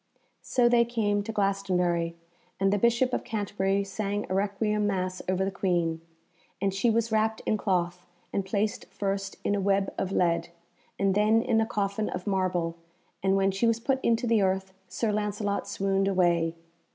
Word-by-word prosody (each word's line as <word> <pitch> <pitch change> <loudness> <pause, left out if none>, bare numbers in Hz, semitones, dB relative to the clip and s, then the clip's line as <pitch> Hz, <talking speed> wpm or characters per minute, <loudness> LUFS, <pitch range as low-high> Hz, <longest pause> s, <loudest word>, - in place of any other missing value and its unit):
So 245 -2 +2
they 240 0 +5
came 215 -4 0
to 205 - -5
Glastonbury, 180 -5 0 0.4
and 195 +1 +3
the 205 - +1
Bishop 235 +3 +2
of - - 0
Canterbury 200 -3 -1
sang 205 +1 -3
a - - -4
Requiem 205 +2 0
Mass 185 -2 -2
over 190 +1 +1
the 195 - -1
Queen, 170 -4 0 0.6
and 195 0 0
she 195 +5 +2
was 230 0 +1
wrapped 220 0 +1
in - - +2
cloth, 180 -3 -1 0.3
and 195 - 0
placed 200 +2 -1
first 195 -1 -3
in - - +1
a 200 - 0
web 195 0 +1
of 190 - -2
lead, 170 -3 +1 0.5
and 195 -1 +2
then 215 +3 +3
in 225 -1 +2
a 220 - 0
coffin 205 -1 -1
of 180 0 -5
marble, 180 -4 0 0.4
and 195 0 +2
when 195 0 +3
she 195 +5 +1
was 230 0 +2
put 265 +3 -1
into 230 +1 +2
the 230 -3 +3
earth 190 0 0
Sir 225 -2 -1
Lancelot 205 -1 -1
swooned 195 -1 0
away. 170 -3 +2
195 Hz, 175 wpm, -28 LUFS, 190-215 Hz, 0.6 s, they